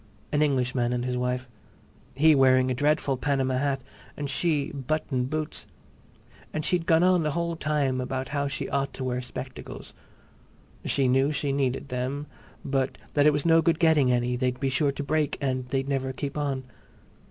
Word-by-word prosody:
An 145 - +2
Englishman 125 -4 +1
and 125 0 -1
his 125 -1 -1
wife, 125 0 -1 0.7
he 155 +3 +6
wearing 130 -2 +4
a - - +2
dreadful 145 0 +1
Panama 130 -1 0
hat 135 -2 -1 0.3
and 145 -1 -3
she 150 -2 0
button 140 -2 -2
boots. 155 +3 -4 0.8
And 155 0 -3
she'd 180 -2 0
gone 165 0 +5
on 180 -1 +4
the 155 - 0
whole 170 0 -1
time 140 -4 0
about 130 +1 -3
how 140 -1 -1
she 135 - -3
ought 140 0 -1
to 130 - -5
wear 125 -1 -1
spectacles; 125 +1 -8 0.9
she 135 -2 +1
knew 135 +3 +3
she 140 -1 -1
needed 135 0 -1
them; 130 +3 -3 0.4
but 135 -1 -1 0.2
that 145 0 +4
it - - +7
was 145 +1 -1
no 165 0 +6
good 165 -1 +2
getting 155 -6 +4
any; 125 0 +1
they'd 125 0 -1
be 135 - 0
sure 140 +2 +2
to 145 - -5
break 155 0 0
and 130 -2 -1
they'd 135 +1 -1
never 135 -1 -1
keep 140 +2 -5
on. 140 -3 -2
140 Hz, 180 wpm, -26 LUFS, 130-150 Hz, 0.9 s, it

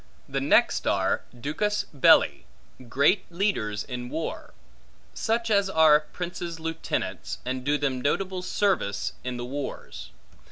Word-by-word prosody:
The - - -2
next - - +3
are - - +1 0.2
duces 205 - -1
belli, 135 - +4 0.4
great 145 - +2
leaders 170 - -1
in 125 -1 -6
war; 160 +3 -5 0.6
such 230 0 -1
as 200 -2 +3
are 160 -4 +6
princes' 170 +1 -6
lieutenants, 165 0 -3
and 130 0 -3
do 145 +2 +2
them 135 -3 -1
notable 185 +6 -1
services 180 - 0
in 125 -1 -4
the 120 - -4
wars. 140 +2 -6
155 Hz, 125 wpm, -26 LUFS, 130-185 Hz, 0.6 s, are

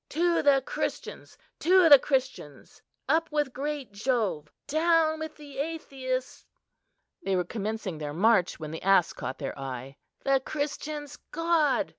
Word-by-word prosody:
To 340 +2 +2
the 275 -2 +4
Christians! - - -5 0.2
to 365 0 +5
the 285 -3 +10
Christians! 255 - -3 0.3
Up 320 +4 +1
with 295 -4 0
great 285 -1 -4
Jove, 205 - -1
down 315 +1 +2
with 315 0 -6
the 285 -3 -10
atheists!" 270 -4 -4 0.8
They 195 -1 0
were 180 - +1
commencing 205 -3 -4
their 150 -1 -4
march 185 +2 +2
when 155 -1 -6
the 160 - -6
ass 195 -2 +3
caught 130 - -5
their - - -5
eye. 135 0 -6 0.3
"The 275 -1 +3
Christians' 290 +1 -4
god!" 320 -3 +1
270 Hz, 140 wpm, -28 LUFS, 195-305 Hz, 0.8 s, the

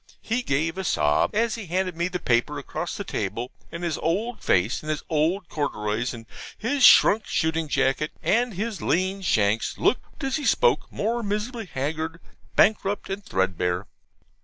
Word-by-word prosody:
He 230 +3 0
gave 165 - -1
a - - -2
sob 75 - +2
as 230 +1 +2
he 220 -5 -6
handed 185 +1 -1
me 170 +1 0
the 180 0 -3
paper 120 -8 +1
across - - -4
the - - -3
table; 115 +6 -3 0.2
and 170 +1 -6
his 170 -2 -1
old 215 +8 -1
face, 95 +7 +2
and 155 - -7
his 155 -1 -2
old 165 +4 +1
corduroys, 115 -7 -2
and 115 -2 -9 0.3
his 265 +4 0
shrunk 220 -3 +7
shooting 160 0 0
jacket, 135 +2 +1
and 235 -1 +2
his 210 -1 -3
lean 190 +3 0
shanks, 110 - +1
looked, 265 +4 -1
as 270 +1 0
he 295 - -4
spoke, 485 -1 +2
more 235 +3 -1
miserably 215 +2 -3
haggard, 160 +3 -3 0.4
bankrupt, 205 -2 +2
and 200 +1 -4
threadbare. 90 - -1
170 Hz, 165 wpm, -25 LUFS, 135-210 Hz, 0.4 s, shrunk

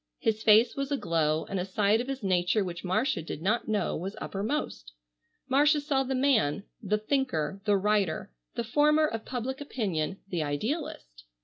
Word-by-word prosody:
His 220 -1 0
face 220 +2 +5
was 275 0 -3
aglow 160 - +1
and 195 - -3
a - - 0
side 205 +3 +2
of 250 - -6
his 270 -3 -4
nature 185 +2 +2
which 170 -2 -6
Marcia 200 - 0
did 160 - -6
not 210 +8 0
know 215 -2 0
was 190 +5 -5
uppermost. 195 - -3 0.5
Marcia 295 +3 +4
saw 285 -2 0
the 265 0 -1
man, 225 - +2 0.2
the 210 0 0
thinker, 210 - -1
the 205 -2 +4
writer, 195 - 0 0.2
the 235 - -1
former 300 +6 +3
of 225 -7 -4
public 260 +2 -4
opinion, 195 - -2
the 175 -4 -2
idealist. 145 - -4
210 Hz, 170 wpm, -28 LUFS, 180-265 Hz, 0.5 s, face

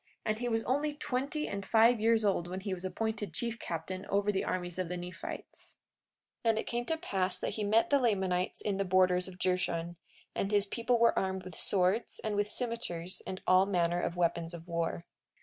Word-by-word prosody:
And 215 0 0
he 245 0 -1
was 225 -1 +1
only 290 +4 0
twenty 290 +2 -2
and 200 0 -4
five 225 +4 +5
years 225 0 +3
old 185 -4 +1
when 185 +2 -4
he 195 -1 -2
was 180 -1 -5
appointed 215 +2 -3
chief 235 -1 -1
captain 175 +3 -4
over 200 +1 +2
the 195 - 0
armies 175 -1 -2
of 180 -2 -1
the 180 - -3
Nephites. 175 +1 -8 0.7
43:18 230 - +3
And 220 - +3
it - - -1
came 240 0 -2
to 320 - -1
pass 190 - -1
that - - -2
he 215 - -3
met 220 +5 +3
the 285 - +5
Lamanites 190 -6 +1
in 200 -2 -1
the 195 - +1
borders 185 -1 +3
of 185 -1 -10
Jershon, 175 -2 -1 0.4
and 195 - -1
his 205 -1 +3
people 235 +4 +1
were 235 0 +4
armed 190 -1 -2
with 185 -1 -9
swords, 190 +6 +1
and 215 -1 -1
with 205 0 +1
cimeters, 210 -8 -3
and 185 - -5
all 185 +1 +5
manner 175 -2 +1
of 175 - -2
weapons 170 -1 0
of 170 0 -11
war. 165 - -2
195 Hz, 210 wpm, -32 LUFS, 180-225 Hz, 0.7 s, five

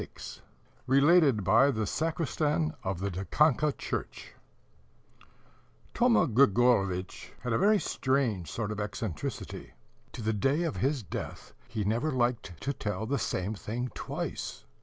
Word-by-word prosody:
"] - - -33 0.3
(RELATED 140 - +5
BY 130 +9 +5
THE 110 -5 0
SACRISTAN 155 - 0
OF 95 -1 -3
THE 100 0 -1
DIKANKA 150 - +2
CHURCH) - - -5 1.6
Thoma 240 -5 +4
Grigorovitch 105 - +2
had 125 -2 -2
a - - +2
very 210 +3 +5
strange 130 - 0
sort 110 -2 -3
of 105 - -4
eccentricity: 105 -5 -5 0.4
to 115 - -6
the 110 +1 +1
day 135 - +1
of 165 - -2
his 135 -2 0
death - - -7
he 115 -3 -3
never 115 +10 0
liked 120 -8 -1
to 140 - -1
tell 105 -3 -3
the 140 +4 -1
same 95 +4 -2
thing 115 +6 -4
twice. - - -5
120 Hz, 135 wpm, -29 LUFS, 105-145 Hz, 1.6 s, RELATED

